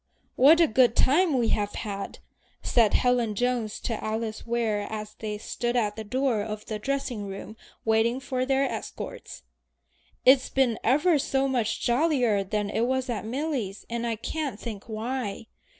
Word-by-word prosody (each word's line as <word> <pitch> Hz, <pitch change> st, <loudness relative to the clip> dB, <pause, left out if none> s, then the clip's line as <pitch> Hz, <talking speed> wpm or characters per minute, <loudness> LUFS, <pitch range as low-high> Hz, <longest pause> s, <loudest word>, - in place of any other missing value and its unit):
"What 300 Hz, +6 st, +7 dB
a 335 Hz, -, +7 dB
good 245 Hz, -3 st, +3 dB
time 305 Hz, +1 st, +3 dB
we 235 Hz, -2 st, +1 dB
have 205 Hz, -1 st, 0 dB
had!" 200 Hz, -2 st, -5 dB, 0.5 s
said 225 Hz, -4 st, +3 dB
Helen 245 Hz, -4 st, +2 dB
Jones 245 Hz, -2 st, -1 dB
to 225 Hz, -3 st, -3 dB
Alice 220 Hz, +1 st, -3 dB
Ware 225 Hz, -3 st, 0 dB
as 215 Hz, -1 st, -5 dB
they 210 Hz, -1 st, -5 dB
stood 240 Hz, +3 st, -3 dB
at 210 Hz, -4 st, +1 dB
the 220 Hz, -, -5 dB
door 250 Hz, 0 st, 0 dB
of 215 Hz, 0 st, -5 dB
the 215 Hz, -1 st, -4 dB
dressing 245 Hz, -4 st, -2 dB
room 195 Hz, +2 st, -7 dB, 0.3 s
waiting 225 Hz, +3 st, +2 dB
for 260 Hz, -1 st, -2 dB
their 270 Hz, +1 st, +2 dB
escorts. -, -, -6 dB, 0.8 s
"It's 260 Hz, 0 st, +6 dB
been 260 Hz, -4 st, +1 dB
ever 295 Hz, +6 st, +3 dB
so 270 Hz, 0 st, +1 dB
much 240 Hz, -5 st, -1 dB
jollier 245 Hz, -6 st, +2 dB
than 205 Hz, +1 st, -2 dB
it 230 Hz, +3 st, +1 dB
was 260 Hz, 0 st, 0 dB
at 220 Hz, -, -3 dB
Milly's, 245 Hz, -5 st, -3 dB
and 235 Hz, 0 st, -2 dB
I 230 Hz, -, -1 dB
can't 265 Hz, 0 st, -4 dB
think 215 Hz, -4 st, -6 dB
why. 225 Hz, -1 st, -3 dB
235 Hz, 165 wpm, -27 LUFS, 215-260 Hz, 0.8 s, What